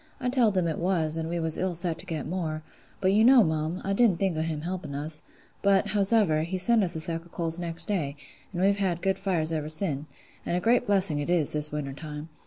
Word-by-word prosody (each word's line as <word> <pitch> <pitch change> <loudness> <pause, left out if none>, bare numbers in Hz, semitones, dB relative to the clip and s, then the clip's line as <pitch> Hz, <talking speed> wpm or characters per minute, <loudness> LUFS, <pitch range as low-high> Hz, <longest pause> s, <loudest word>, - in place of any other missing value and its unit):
I 250 -1 -1
telled 235 -6 +2
him 180 - +2
it 160 -2 -2
was, 170 -3 0
an' 160 0 -3
we 170 +1 -3
was 160 -1 0
ill 185 -1 -1
set 170 -1 -2
to 185 - -6
get 160 -5 -4
more: 155 -2 -4 0.4
but 190 0 +2
you 215 +2 +4
know, 250 0 +7
mum, 160 +1 -2
I 195 - -1
didn't 210 -4 +3
think 190 -3 0
o' 155 - -1
him 160 -2 -3
helping 170 -4 -5
us; 155 +2 -1 0.4
but, 195 -1 +3
howsever, 200 -6 +3
he 170 +4 -3
sent 220 +4 +5
us 175 -2 0
a - - -2
sack 165 +1 0
o' 170 - -18
coals 165 0 -3
next 165 -1 -4
day; 155 -9 -2 0.4
an' 180 -2 -4
we've 200 +1 +3
had 180 -4 -1
good 190 -1 0
fires 165 -5 0
ever 155 -2 -3
sin': 155 -3 0 0.4
and 175 - -1
a - - +1
great 235 +5 +2
blessing 190 -7 +4
it 145 - -3
is, 170 -5 +2
this 150 0 +1
winter 145 -2 -4
time. 150 +1 -8
170 Hz, 245 wpm, -27 LUFS, 155-195 Hz, 0.4 s, know